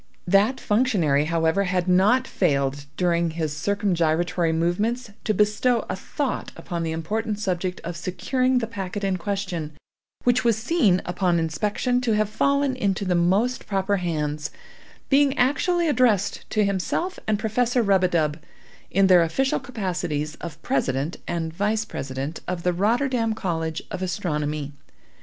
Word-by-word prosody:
That 200 +8 +3
functionary, 195 - +2
however, 165 +4 +1
had 180 0 0
not 200 +8 +4
failed, 140 -4 0
during 170 -2 +2
his 160 -2 -3
circumgyratory 175 -2 +1
movements, 205 +9 0
to - - +2
bestow 210 +3 +2
a - - -2
thought 270 +7 -3
upon 175 -3 -4
the 165 -1 -2
important 210 +7 -2
subject 185 -3 -2
of 170 0 -5
securing 255 - 0
the 240 - +1
packet 205 -2 -5
in 190 -1 +1
question, 180 -4 -3 0.5
which 245 +1 +3
was 230 -3 +3
seen, 220 - +2
upon 180 -1 +1
inspection, 205 - 0
to 235 -3 +1
have 215 0 +1
fallen 280 +3 +1
into 200 -5 -1
the 185 - +1
most 195 +9 +1
proper 195 0 0
hands, 150 -4 -2 0.6
being 280 0 +4
actually 330 +7 +2
addressed 240 - +1
to 215 -1 +2
himself 200 - -1
and 215 -1 +2
Professor 235 +3 +1
Rub 195 -3 +3
a - - +5
dub, 155 -3 0 0.5
in 195 0 +3
their 185 -2 +6
official 265 +12 +1
capacities 180 - -3
of 160 -1 -7
President 135 +4 -1
and 165 -2 -2
Vice 210 +4 0
President 135 +3 -5
of 180 -1 -3
the 180 - +2
Rotterdam 225 +4 +1
College 165 -5 -2
of 185 - -4
Astronomy. 150 -5 -2
190 Hz, 145 wpm, -24 LUFS, 165-225 Hz, 0.6 s, their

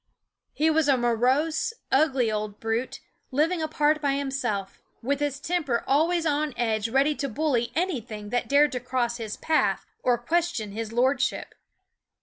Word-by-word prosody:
He 315 +1 +2
was 315 -1 +2
a 275 -2 +4
morose, 255 - +1 0.2
ugly 265 -5 +3
old 210 -1 -4
brute, 225 +3 -2 0.3
living 320 +5 +1
apart 305 -1 +1
by 280 -2 +1
himself, 255 -8 -3 0.2
with 280 +3 0
his 290 -2 -1
temper 295 -7 -1
always 330 +5 +2
on 300 -3 0
edge 220 -2 0
ready 275 +5 +3
to 280 -1 -3
bully 245 -3 0
anything 240 - -3
that 245 +2 -1
dared 285 +1 +5
to 250 - -2
cross 245 -1 -1
his 220 -3 -5
path 320 -1 +1 0.2
or 245 -1 +2
question 320 -4 -1
his 220 +1 -5
lord 255 +3 +2
ship. - - -2
270 Hz, 155 wpm, -26 LUFS, 235-305 Hz, 0.3 s, dared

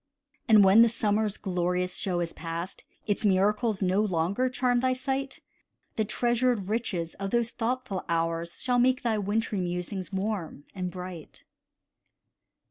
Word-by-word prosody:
And 215 -2 +7
when 195 +4 +7
the 235 - +6
summer's 215 -2 0
glorious 180 -1 -1
show 180 -3 -1
is 170 -1 -3
past, 170 +2 -6 0.2
Its 205 0 -1
miracles 210 +2 +2
no 185 +2 +2
longer 200 +5 0
charm 250 -1 +1
thy 255 +1 +2
sight, 265 +1 -3 0.5
The 220 - 0
treasured 240 -2 +1
riches 190 -7 -2
of 195 0 -2
those 235 +1 +1
thoughtful 240 -4 -2
hours 165 0 -1
Shall 250 -1 +2
make 255 +1 +3
thy 225 -3 +1
wintry 205 0 -1
musings 180 +2 -4
warm 190 -6 -3
and 185 -2 -3
bright. 180 -3 -9
205 Hz, 140 wpm, -28 LUFS, 180-235 Hz, 0.5 s, And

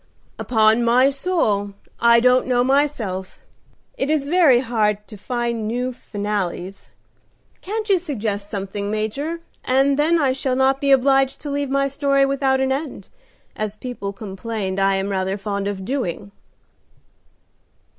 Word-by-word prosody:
"Upon 220 0 +3
my 250 +3 +4
soul, 245 - 0 0.3
I 235 0 +6
don't 250 +2 +3
know 245 -1 +2
myself. 250 -9 -1 0.6
It 270 - 0
is 305 -3 +1
very 295 -6 +4
hard 210 -4 0
to 215 - -11
find 235 0 -3
new 250 +3 -2
finales. 200 -4 -4 0.7
Can't 430 +3 -4
you 390 -3 +3
suggest 215 - -3
something, 200 0 -4
Major? 275 +11 -3 0.3
then 280 +5 +3
I 270 -4 +2
shall 260 -1 -1
not 265 +1 +2
be 280 - +1
obliged 270 0 +3
to 290 - -5
leave 285 -1 -2
my 275 0 +1
story 275 0 +2
without 270 -1 +1
an 265 0 +1
end, 270 - -4 0.5
as 215 -1 -3
people 215 -3 -5
complain 200 -1 -5
I 195 0 +3
am 195 +1 -2
rather 190 0 -1
fond 200 -1 -3
of 195 -2 -4
doing." 205 -6 -3
245 Hz, 140 wpm, -21 LUFS, 205-275 Hz, 0.7 s, I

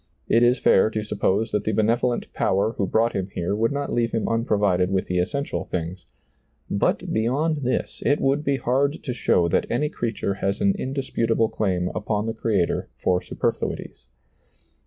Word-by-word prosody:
It 115 - +4
is 120 +2 +4
fair 110 -2 +4
to 110 -1 -3
suppose 105 +1 0
that 105 - 0
the 110 - -1
benevolent 115 +3 +1
Power 100 +3 +1
who 100 -4 -1
brought 115 +4 +2
him 95 -1 -2
here 90 +3 -1
would 115 +2 +1
not 140 0 -2
leave 115 -1 0
him 115 -2 0
unprovided 105 -5 +1
with 95 -1 0
the 90 0 -1
essential 140 +11 -2
things; 90 +1 -5 0.6
but - - 0
beyond 140 +8 +1
this, 130 -3 -2
it 145 - +2
would 140 +2 +1
be 140 -2 +1
hard 140 +4 0
to 125 - -3
show 90 -7 +2
that - - +1
any 150 +5 0
creature 115 -8 -2
has 100 +1 -2
an 200 - +3
indisputable 115 - 0
claim 95 -5 -1
upon 105 -1 -1
the 115 - -2
Creator 105 -6 0
for 90 0 +1
super - - -1
fluities. - - -6
110 Hz, 180 wpm, -24 LUFS, 100-125 Hz, 0.6 s, It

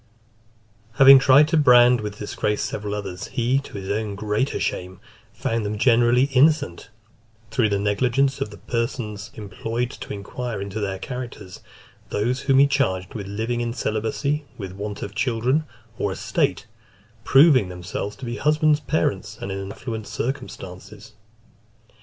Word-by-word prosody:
Having 135 +2 +9
tried 135 +3 +6
to 165 - +2
brand 125 -4 +6
with 105 -1 -6
disgrace 105 0 -2
several 105 0 -3
others, 95 -3 -6
he, 125 +3 +1
to 140 - -12
his 95 0 -5
own 105 -1 -2
greater 105 +6 -1
shame, 90 0 -3 0.3
found 115 -1 -2
them 105 +1 -3
generally 120 +2 +4
innocent, 135 - +2 0.6
through 115 -2 +2
the 100 - +1
negligence 125 +7 +1
of - - -1
the 105 - -12
persons 115 -3 -3
employed 115 +4 -4
to - - -9
inquire 110 +3 -5
into 100 +2 -5
their 100 -2 -2
characters; 120 -6 -7 0.5
those 120 +5 -1
whom 135 -1 +2
he 140 - +7
charged 115 -10 0
with 100 -3 -6
living 110 +4 -2
in 120 -1 -2
celibacy, 120 +8 -1
with 95 -4 -6
want 100 +2 -6
of 100 - -6
children, 125 +7 0 0.3
or 100 - 0
estate, - - -1 0.6
proving 135 - +5
themselves 90 +3 -5
to 105 - -9
be 120 +1 -4
husbands, 150 0 +3
parents, 105 - -1
and 100 - -5
in 95 0 -5
affluent 110 0 -6
circumstances. 105 -4 -6
110 Hz, 145 wpm, -23 LUFS, 100-130 Hz, 0.6 s, Having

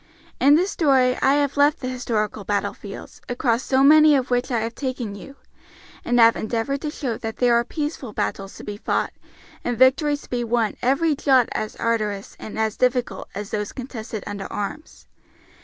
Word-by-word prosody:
In 280 +2 +6
this 370 +5 +1
story 260 -5 +3
I 270 +1 +4
have 285 -1 0
left 290 +3 +4
the 255 - -4
historical 225 -5 -2
battlefields, 205 +1 -4
across 245 -1 +1
so 265 0 +2
many 305 +1 +7
of 260 -2 -1
which 245 0 +1
I 235 -3 0
have 225 +1 -3
taken 255 -5 -4
you, 275 +7 -11 0.7
and 245 0 +1
have 230 0 +7
endeavored 235 +5 -2
to 305 - -3
show 265 -6 -4
that 225 0 -5
there 245 -1 +3
are 235 0 +4
peaceful 290 -3 -4
battles 195 -1 -3
to - - -10
be 205 -1 -6
fought - - -1 0.5
and 245 -1 -2
victories 290 +4 +3
to - - -16
be 245 -1 -1
won 230 -2 0
every 290 +5 +2
jot 265 -4 +3
as 215 0 -3
arduous 215 -4 -2
and 220 - -8
as 220 -1 -1
difficult 250 -1 0
as 205 +1 -6
those 210 -1 -3
contested 230 -4 -6
under 200 -1 -6
arms. 245 +10 -6
245 Hz, 185 wpm, -23 LUFS, 220-275 Hz, 0.7 s, many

